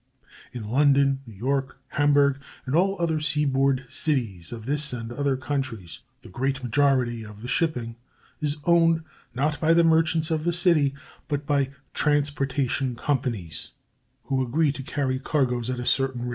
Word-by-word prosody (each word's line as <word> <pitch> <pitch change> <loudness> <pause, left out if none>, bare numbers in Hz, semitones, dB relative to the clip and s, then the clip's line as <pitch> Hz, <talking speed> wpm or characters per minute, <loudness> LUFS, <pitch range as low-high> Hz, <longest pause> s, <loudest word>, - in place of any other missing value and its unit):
In 115 -4 -6
London, 140 +2 +3
New 110 - -11
York, 135 +5 -2
Hamburg, 140 -1 +3 0.2
and 130 +2 -1
all 195 +2 +2
other 165 -2 +1
seaboard 140 -3 +1
cities 115 - -1
of 115 -2 -7
this 145 +1 +1
and 115 -1 -5
other 140 +1 0
countries, 125 - -4 0.2
the - - -12
great 135 +6 -2
majority 125 -2 +1
of 105 0 -11
the - - -5
shipping 125 -4 -1 0.4
is 150 -1 -1
owned, 165 -1 +4 0.3
not 150 +4 0
by 165 +1 +4
the 170 - +5
merchants 160 0 +2
of 155 -1 0
the 175 +1 +1
city, 165 -5 +3 0.3
but 145 -1 -2
by 140 -2 +1 0.2
"transportation 140 -3 0
companies," 115 - -3 0.5
who 135 -1 -1
agree 140 +4 +1
to 140 - -7
carry 130 -1 -2
cargoes 125 -4 0
at 125 -1 -2
a 125 - -4
certain 130 -2 +1
rate. 125 - -3
135 Hz, 160 wpm, -25 LUFS, 125-150 Hz, 0.5 s, the